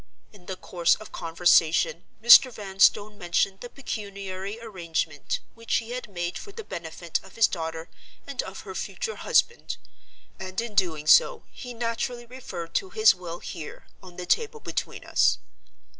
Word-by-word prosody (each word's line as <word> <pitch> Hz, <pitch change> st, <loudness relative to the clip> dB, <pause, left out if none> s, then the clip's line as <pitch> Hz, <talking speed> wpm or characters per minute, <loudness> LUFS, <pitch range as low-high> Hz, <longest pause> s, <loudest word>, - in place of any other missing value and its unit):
In 185 Hz, -4 st, -18 dB
the 190 Hz, -, -4 dB
course 175 Hz, -2 st, +2 dB
of 215 Hz, -, -12 dB
conversation, 165 Hz, -, +3 dB, 0.2 s
Mr. 240 Hz, +2 st, +9 dB
Vanstone 205 Hz, 0 st, +2 dB
mentioned 190 Hz, +2 st, 0 dB
the 245 Hz, -, -8 dB
pecuniary 200 Hz, -5 st, -6 dB
arrangement 170 Hz, -9 st, -3 dB
which 230 Hz, 0 st, -2 dB
he 230 Hz, 0 st, -1 dB
had 250 Hz, -2 st, -5 dB
made 175 Hz, -2 st, -3 dB
for 405 Hz, -, -10 dB
the 450 Hz, +2 st, -8 dB
benefit 170 Hz, -, -4 dB
of 190 Hz, -, -16 dB
his 230 Hz, -, +6 dB
daughter 160 Hz, -1 st, -3 dB, 0.4 s
and -, -, -3 dB
of -, -, -8 dB
her -, -, -8 dB
future 470 Hz, -2 st, -4 dB
husband—and, 190 Hz, -, -2 dB
in 235 Hz, -2 st, -4 dB
doing 170 Hz, -7 st, +1 dB
so, 465 Hz, -, +5 dB
he 245 Hz, -2 st, -9 dB
naturally 240 Hz, +1 st, -3 dB
referred 195 Hz, -9 st, -8 dB
to 190 Hz, -, 0 dB
his 215 Hz, +3 st, +6 dB
will 175 Hz, -2 st, -8 dB
here, 160 Hz, -4 st, -8 dB, 0.2 s
on 180 Hz, -2 st, -13 dB
the 180 Hz, -, -5 dB
table 450 Hz, -, +1 dB
between -, -, -4 dB
us. -, -, +3 dB
195 Hz, 155 wpm, -26 LUFS, 175-235 Hz, 0.4 s, Mr